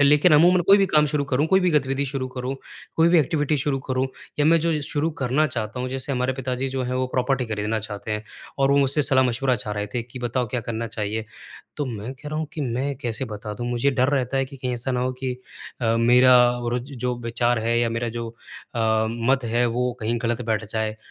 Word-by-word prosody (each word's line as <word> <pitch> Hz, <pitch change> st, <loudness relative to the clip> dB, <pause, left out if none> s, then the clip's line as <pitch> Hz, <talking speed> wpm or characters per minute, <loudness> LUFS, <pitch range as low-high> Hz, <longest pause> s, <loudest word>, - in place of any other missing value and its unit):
लेकिन 150 Hz, +4 st, +5 dB
अमूमन 175 Hz, +4 st, +6 dB
कोई 200 Hz, +1 st, +7 dB
भी 195 Hz, -, +3 dB
काम 150 Hz, -3 st, +4 dB
शुरू 145 Hz, -1 st, -1 dB
करूँ, 140 Hz, +3 st, +1 dB
कोई 190 Hz, +2 st, +4 dB
भी 180 Hz, -1 st, +2 dB
गतिविधि 140 Hz, -2 st, +1 dB
शुरू 130 Hz, -1 st, -3 dB
करूँ, 130 Hz, +1 st, -4 dB, 0.4 s
कोई 165 Hz, +1 st, +5 dB
भी 170 Hz, -1 st, +5 dB
एक्टिविटी 150 Hz, 0 st, +1 dB
शुरू 135 Hz, 0 st, 0 dB
करूँ 130 Hz, 0 st, +1 dB, 0.3 s
या 145 Hz, -, +3 dB
मैं 165 Hz, +1 st, +5 dB
जो 165 Hz, -2 st, 0 dB
शुरू 150 Hz, +3 st, -1 dB
करना 135 Hz, +4 st, +2 dB
चाहता 120 Hz, -1 st, -3 dB
हूँ। 130 Hz, -, -2 dB
जैसे 135 Hz, +2 st, -3 dB
हमारे 125 Hz, +1 st, 0 dB
पिताजी 130 Hz, 0 st, -3 dB
जो 130 Hz, 0 st, -2 dB
हैं 125 Hz, +1 st, -2 dB
वो 130 Hz, 0 st, 0 dB
प्रॉपर्टी 125 Hz, 0 st, 0 dB
खरीदना 110 Hz, 0 st, -1 dB
चाहते 105 Hz, 0 st, -6 dB
हैं 105 Hz, +1 st, -2 dB, 0.3 s
और 135 Hz, 0 st, +3 dB
वो 140 Hz, -, +4 dB
मुझसे 140 Hz, +2 st, +2 dB
सलाह-मशविरा 130 Hz, -1 st, +2 dB
चाह 105 Hz, 0 st, -3 dB
रहे 105 Hz, 0 st, -2 dB
थे 120 Hz, -, 0 dB
कि 125 Hz, +2 st, -10 dB
बताओ 120 Hz, 0 st, -1 dB
क्या 120 Hz, +2 st, -2 dB
करना 115 Hz, 0 st, -4 dB
चाहिए। 110 Hz, 0 st, -3 dB, 0.5 s
तो 145 Hz, -2 st, -2 dB
मैं 115 Hz, +1 st, -5 dB
कह 140 Hz, +3 st, -9 dB
रहा 155 Hz, +1 st, -3 dB
हूँ 155 Hz, -, -2 dB
कि 155 Hz, -, -5 dB
मैं 135 Hz, +2 st, -1 dB
कैसे 120 Hz, +2 st, -2 dB
बता 105 Hz, -2 st, -6 dB
दूँ 120 Hz, +3 st, -5 dB
मुझे 120 Hz, +4 st, +1 dB
डर 130 Hz, 0 st, +2 dB
रहता 135 Hz, -1 st, 0 dB
है 135 Hz, -, +2 dB
कि 135 Hz, +1 st, -11 dB
कहीं 125 Hz, -1 st, -3 dB
ऐसा 120 Hz, +3 st, -4 dB
ना 125 Hz, -, 0 dB
हो 130 Hz, +1 st, 0 dB
कि 130 Hz, -1 st, -1 dB, 0.5 s
अ, 115 Hz, -1 st, +2 dB
मेरा 125 Hz, +2 st, +6 dB, 0.2 s
और 120 Hz, 0 st, -2 dB
ज 140 Hz, +3 st, -10 dB
जो 125 Hz, 0 st, 0 dB
विचार 120 Hz, 0 st, +1 dB
है 115 Hz, +1 st, +1 dB
या 120 Hz, 0 st, +2 dB
मेरा 115 Hz, +1 st, -2 dB
जो 115 Hz, 0 st, -4 dB, 0.5 s
अ, 110 Hz, -1 st, +2 dB
मत 120 Hz, +3 st, +1 dB
है 120 Hz, +1 st, +1 dB
वो 125 Hz, +1 st, 0 dB
कहीं 115 Hz, +2 st, -1 dB
गलत 120 Hz, +1 st, -1 dB
बैठ 110 Hz, -1 st, 0 dB
जाए 110 Hz, -1 st, -1 dB
125 Hz, 240 wpm, -23 LUFS, 115-140 Hz, 0.5 s, कोई